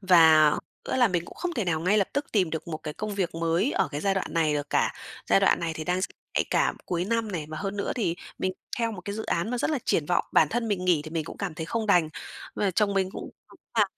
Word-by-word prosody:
Và 160 -5 +7 0.4
nữa - - 0
là 245 -2 +5
mình 175 -3 -1
cũng - - -12
không 355 -1 -3
thể 230 - 0
nào 160 -3 0
ngay 200 +5 +3
lập 195 - +1
tức 285 0 -1
tìm 185 -6 +2
được 160 +1 -4
một 155 -1 -4
cái 150 -1 -5
công 215 -1 -4
việc 185 -4 -1
mới 165 - +1
ở - - +1
cái 145 0 -4
giai 195 +2 +1
đoạn 190 - -1
này 155 -2 +2
được 145 0 -3
cả, - - +2 0.4
giai 100 - +6
đoạn - - +4
này 165 -1 -1
thì 155 - -5
đang 180 +2 0
rất - - -1 0.3
nhạy - - +2
cảm, - - +2
cuối 175 0 -1
năm 225 0 -1
này. 160 -4 -3
Và 155 - -6
hơn 195 +1 -3
nữa 200 - -1
thì 175 -8 0 0.2
mình 185 - 0 0.3
theo 230 -1 0
một 185 - -7
cái 200 +3 -5
dự 220 +1 -4
án 170 +6 0
mà 250 - -1
rất 245 - 0
là 300 - +1
triển 150 - +1
vọng, 175 - +2
bản - - +5
thân 230 -1 -1
mình 190 -3 -1
nghỉ 175 -4 +3
thì 155 - -7
mình 160 -2 -2
cũng - - -8
cảm 195 -6 -4
thấy 160 +1 -5
không 225 +2 -2
đành. 175 -6 +4 0.5
Và 200 - +1
chồng 200 +2 +1
mình 190 -1 +1
cũng - - -7 0.2
nói - - -17 0.2
là - - +7
180 Hz, 290 wpm, -27 LUFS, 165-210 Hz, 0.5 s, Và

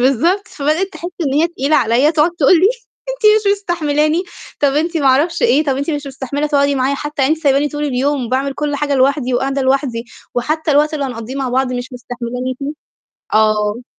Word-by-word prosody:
بالضبط، 340 - +2
فبدأت 310 +6 -1
تحس 335 +3 -6 0.2
إن 270 - -1
هي 325 +3 +3
تقيلة 305 -2 0
عليَّ، 245 +7 +3
تقعد 310 +2 +3
تقول 275 +3 +5
لي: 385 - +5 0.4
"أنت - - -4 0.3
مش 400 - +5
مستحملاني، 320 -4 0 0.4
طب 285 - +4
أنتِ 325 +4 0
ما 285 -3 +1
أعرفش 315 - +2
إيه، 310 - +3
طب 275 -3 0
أنتِ 280 +4 -2
مش 290 -2 -3
مستحملة 275 +2 -3
تقعدي 285 -1 +2
معايا 265 +1 +1
حتى؟ 295 0 -3
يعني 285 +4 +3
أنتِ 320 - -16
سايباني 280 +1 +3
طول 295 +1 -4
اليوم 270 -2 -1
باعمل 270 +2 -1
كُل 290 0 -2
حاجة 285 0 -1
لوحدي 265 -1 +1
وقاعدة 270 +2 0
لوحدي 260 -3 0 0.3
وحتى 310 +6 -1
الوقت 300 +2 +3
اللي 285 - -2
هنقضيه 245 -1 -6
مع 270 -2 -2
بعض 255 +1 0
مش 245 +1 -5
مستحملاني 245 +1 -5
فيه؟" 280 +2 -3 0.6
آه. 215 +2 +1
280 Hz, 195 wpm, -17 LUFS, 260-305 Hz, 0.6 s, تقول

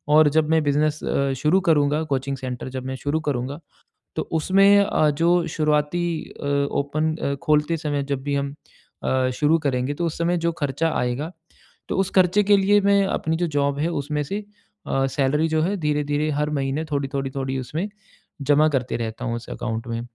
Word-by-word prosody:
और 155 -1 +7
जब 155 +1 +1
मैं 160 0 +4
बिजनेस 150 +1 +1
अ, 140 -1 0
शुरू 155 +8 +3
करूँगा 150 -3 +2
कोचिंग 135 +1 -2
सेंटर 130 -1 -5
जब 130 0 -6
मैं 130 0 -3
शुरू 145 +4 -1
करूँगा 135 +2 -3 0.6
तो - - -1 0.2
उसमें 195 +4 +5
अ, 155 -6 +2
जो 170 +3 +2
शुरुआती 150 +2 +1 0.4
अ, - - -5 0.3
ओपन 155 +3 -1
अ, 140 - -1
खोलते 150 +2 +2
समय 145 -3 -2
जब 135 - -3
भी 145 0 -1
हम 140 0 -2 0.5
अ, 130 -1 +1
शुरू 150 +4 +3
करेंगे 130 +1 0
तो 170 - -1
उस 165 - -3
समय 175 +1 +1
जो - - +2
खर्चा 160 +4 0
आएगा 125 +7 -2 0.6
तो - - -1
उस 190 0 +1
खर्चे 185 +2 +4
के 205 +1 +5
लिए 200 +1 +4
मैं 200 0 +4
अपनी 160 -3 -1
जो 175 0 0
जॉब 140 0 +1
है 155 - +1 0.2
उसमें 150 +1 -2
से 200 +8 -4 0.4
अ, 135 0 +1
सैलरी 140 +4 +1
जो 160 0 +1
है 190 +5 0
धीरे-धीरे 150 -1 0
हर 150 +1 0
महीने 135 +4 -2
थोड़ी-थोड़ी, 140 -1 -2
थोड़ी 135 -1 -2
उसमें 155 +9 -3 0.5
जमा 145 +2 +4
करते 130 -4 -1
रहता 115 +1 -4
हूँ 120 -1 -1
उस 120 - -8
अकाउंट 115 0 -4
में। 115 0 -3
150 Hz, 190 wpm, -23 LUFS, 135-160 Hz, 0.6 s, और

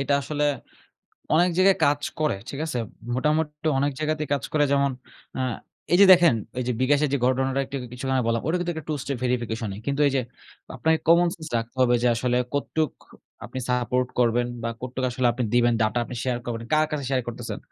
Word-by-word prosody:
এটা 140 +1 +1
আসলে 150 +1 -1 0.9
অনেক 175 +3 +4
জায়গায় 190 +1 +5
কাজ 145 0 +2 0.2
করে, 150 -10 +1
ঠিক 140 - -6
আছে? 155 - -4 0.4
মোটামুটি 150 +3 0
অনেক 140 +1 +1
জায়গাতেই 155 -1 -1
কাজ 140 - 0
করে 150 -1 +3
যেমন, 140 0 +3 0.5
আ - - -1 0.5
এই 175 - +5
যে - - +9
দেখেন 175 -6 +6 0.2
ঐ - - -2
যে - - +2
বিকাশের 145 +3 +3
যে 140 - +2
ঘটনাটা 135 +1 +1
একটু 140 - -12
আগে 125 -1 -7
কিছুক্ষন 130 +1 -2
আগে 125 - +1
বললাম। 115 0 0
ওটাও 165 +4 +1
কিন্তু 175 0 -1
একটা 160 - -6
2 - - 0
স্টেপ 140 -2 -3
ভেরিফিকেশন 115 -3 -1
ই। - - -9
কিন্তু 140 +1 -1
এই 140 - +2
যে - - +2 0.6
আপনাকে 160 +5 +2
কমনসেন্স 170 -1 +3
রাখতে 115 +2 -4
হবে, 120 -1 +4
যে - - +2
আসলে 125 +1 0 0.2
কতটুক 155 +1 -1 0.5
আপনি 130 - -6
সাপোর্ট 125 0 0
করবেন? 120 0 +2 0.2
বা 115 - -1
কতটুক 130 +1 -3
আসলে 125 0 0
আপনি 120 +1 -2
দিবেন 120 0 +4
ডাটা? 110 +2 +1
আপনি 125 - -7
শেয়ার 125 -2 0
করবেন। 115 -1 -4
কার 155 0 +4
কাছে 145 -3 -3
শেয়ার 130 -1 +1
করতেছেন? 120 - -5
135 Hz, 205 wpm, -25 LUFS, 125-155 Hz, 0.9 s, যে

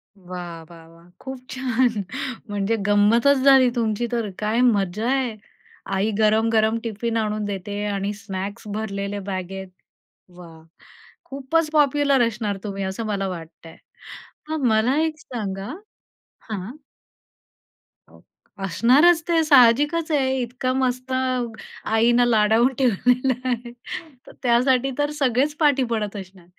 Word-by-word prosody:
वाह! 180 -3 -8
वाह! 165 -1 -14
वाह! 165 +1 -19
खूप 265 -1 -7
छान! 250 -4 0 0.5
म्हणजे 205 +2 0
गंमतच 225 +7 +4
झाली 270 -2 +6
तुमची 230 0 -1
तर 230 -3 -1
काय 215 +3 0
मजा 210 -2 +1
आहे. 260 -4 0 0.6
आई 200 +3 +1
गरम-गरम 220 +1 +3
टिफिन 230 +1 -3
आणून 215 -1 -1
देते 205 +1 -4
आणि 200 0 -2
स्नॅक्स 200 -1 -6
भरलेले 205 -1 -4
बॅगेत. 190 0 -5 0.7
वाह! 165 -2 -13 0.6
खूपच 280 +4 -1
पॉप्युलर 280 -4 +3
असणार 215 -3 -3
तुम्ही 195 -2 -4
असं 190 +4 -4
मला 200 -2 -2
वाटतंय. 165 -2 -9 0.7
मग 315 -3 -2
मला 225 +5 +2
एक 320 -1 -2
सांगा 200 -5 -5 0.8
हां. 205 0 -5 1.9
असणारच 280 - +4
ते 335 -2 +3
साहजिकच 295 +4 +4
आहे, 265 -3 +1
इतका 250 +1 -2
मस्त 255 0 -1
आईनं 240 -2 0
लाडावून 225 +2 +3
ठेवलेलं 250 +1 +2 0.2
आहे 240 -1 -3 0.6
तर - - -11
त्यासाठी 255 +2 +3
तर 290 0 +1
सगळेच 275 +2 +1
पाठी 285 -4 +3
पडत 210 -2 -2
असणार. 190 -2 -10
230 Hz, 115 wpm, -22 LUFS, 200-260 Hz, 1.9 s, झाली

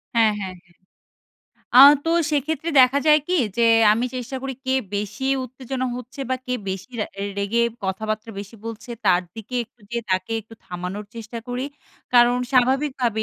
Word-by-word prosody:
হ্যাঁ, 225 -2 +4
হ্যাঁ, 190 -2 -5
হ্যাঁ। 175 -1 -28 1.0
আ - - +10 0.3
তো 330 - 0 0.2
সেক্ষেত্রে 305 +2 -1
দেখা 255 +2 +5
যায় 300 0 +7
কি? 365 - +1 0.2
যে 235 -1 +4 0.3
আমি 230 +3 0
চেষ্টা 255 +2 -5
করি 270 -1 -4
কে 260 - 0 0.2
বেশি 205 +5 -3 0.2
উত্তেজনা 255 +1 -4
হচ্ছে। 250 +3 -9
বা 260 - +2
কে 250 - -1
বেশি 190 +5 -5
রা - - -1 0.3
রেগে 210 +4 +1 0.2
কথাবার্তা 215 +4 -3
বেশি 205 +2 -8
বলছে, 230 +1 -7
তার 180 -2 +4
দিকে 225 +2 -9
একটু 235 +1 -36
যেয়ে 235 0 -2
তাকে 185 +5 0
একটু 220 +1 -15
থামানোর 180 +2 -5
চেষ্টা 230 0 -7
করি। 245 +1 -2 0.5
কারণ 240 0 +6 0.2
স্বাভাবিকভাবে 255 -3 +2
235 Hz, 165 wpm, -22 LUFS, 210-260 Hz, 1.0 s, আ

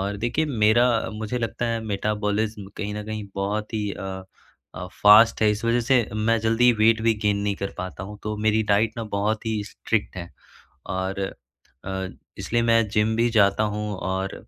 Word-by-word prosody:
और 100 +1 -2
देखिए 120 +9 -1
मेरा, 120 -1 +3 0.2
मुझे 110 +3 -4
लगता 115 +1 -2
है 115 -1 -1
मेटाबॉलिज्म 105 0 -2
कहीं 105 -1 -4
न 105 0 -5
कहीं 110 -1 -5
बहुत 105 +3 -3
ही 105 -2 -1
अ 95 -1 -6 0.5
अ, 90 +3 -6 0.2
फ़ास्ट 110 +2 +7
है 105 - +5
इस 105 +3 -3
वज़ह 115 +1 +2
से 125 -1 +3
मैं 110 +2 +1
जल्दी 115 +2 +4
वेट 115 0 +4
भी 115 0 +3
गेन 105 -1 +2
नहीं 100 -1 0
कर 100 - -3
पाता 95 0 -6
हूँ 105 0 -10
तो 105 0 -3
मेरी 110 0 +3
डाइट 110 +2 +2
ना 115 - -4
बहुत 110 +2 -1
ही 110 -2 -1
स्ट्रिक्ट 105 -2 -3
है 85 -1 -7 0.7
और 95 +1 -3 0.7
अ, 95 0 -3 0.3
इसलिए 120 0 -1
मैं 115 -1 +3
जिम 105 +1 +1
भी 120 +1 +2
जाता 105 -2 +3
हूँ। 105 0 -3
और 95 +1 -3
105 Hz, 185 wpm, -24 LUFS, 100-115 Hz, 0.7 s, फ़ास्ट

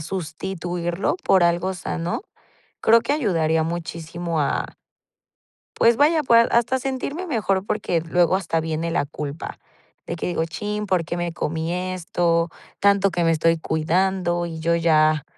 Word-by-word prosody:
sustituirlo 175 - -3
por 190 - +4
algo 175 +2 +1
sano, 175 - -3 0.6
creo 230 +1 +5
que 240 +5 -1
ayudaría 165 - +1
muchísimo 170 0 -4
a 145 - -1 1.0
pues 230 0 +4
vaya, 310 +2 +4
pues 230 -3 +5
hasta 240 +2 +3
a - - -1
sentirme 270 +6 -3
mejor 200 - 0
porque 190 -6 0
luego 170 +2 +2
hasta 165 -3 -1
viene 160 +1 -2
la 155 - +1
culpa. 145 +1 -6 0.5
De 170 - -4
que - - -4
digo: 170 -2 0
"Chin, 210 +5 -4
¿por 185 -3 +1
qué 170 +1 -4
me 175 -1 -2
comí 160 0 -2 0.2
esto? 170 -1 0 0.3
Tanto 200 -1 +4
que 175 -1 0
me 165 - +3
estoy 165 +1 +2
cuidando 175 +2 0
y 165 -1 -6
yo 170 +1 +2
ya 155 -3 +3
175 Hz, 150 wpm, -23 LUFS, 165-195 Hz, 1.0 s, creo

